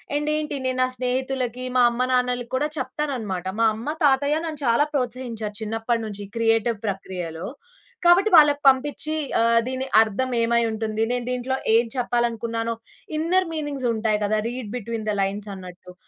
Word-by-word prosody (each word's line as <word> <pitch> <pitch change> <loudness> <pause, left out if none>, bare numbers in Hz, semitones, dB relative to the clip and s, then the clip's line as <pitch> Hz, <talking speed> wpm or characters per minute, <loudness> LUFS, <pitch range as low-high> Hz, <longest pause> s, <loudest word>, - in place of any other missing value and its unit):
And 295 +1 0
ఏంటి 305 -1 -2
నేను 255 0 -1
నా 255 - +4
స్నేహితులకి, 255 0 -2
మా 250 - +6
అమ్మ 245 +2 0
నాన్నలకి 250 -1 0
కూడా 295 +3 +1
చెప్తానన్నమాట. 250 -10 -3 0.2
మా 230 - +5
అమ్మ, 245 +8 -4
తాతయ్య 285 +2 +3
నన్ను 310 -2 -5
చాలా 235 +6 +4
ప్రోత్సహించారు 235 -5 -3
చిన్నప్పటినుంచి 220 -1 -2
క్రియేటివ్ 225 -1 +2
ప్రక్రియలో. 180 -3 -4 0.6
కాబట్టి 365 +5 +6
వాళ్ళకి 295 -2 +6
పంపిచ్చి 290 +4 +2 0.3
ఆహ్, 230 0 +4
దీని 260 +1 -3
అర్థం 225 +4 0
ఏమై 235 0 +3
ఉంటుంది? 220 0 -2
నేను 245 -1 -2
దీంట్లో 250 +1 -1 0.2
ఏం 235 +1 +4
చెప్పాలనుకున్నానో 230 -2 -1 0.4
ఇన్నర్ 360 +3 +2
మీనింగ్స్ 290 -5 -3
ఉంటాయి 220 -1 0
కదా! 215 +1 +1
రీడ్ 240 -4 -6
బిట్వీన్ 230 -1 -5
థ్ 205 - 0
లైన్స్ 200 +2 -2
అన్నట్టు, 180 -1 -11
240 Hz, 150 wpm, -23 LUFS, 220-265 Hz, 0.6 s, మా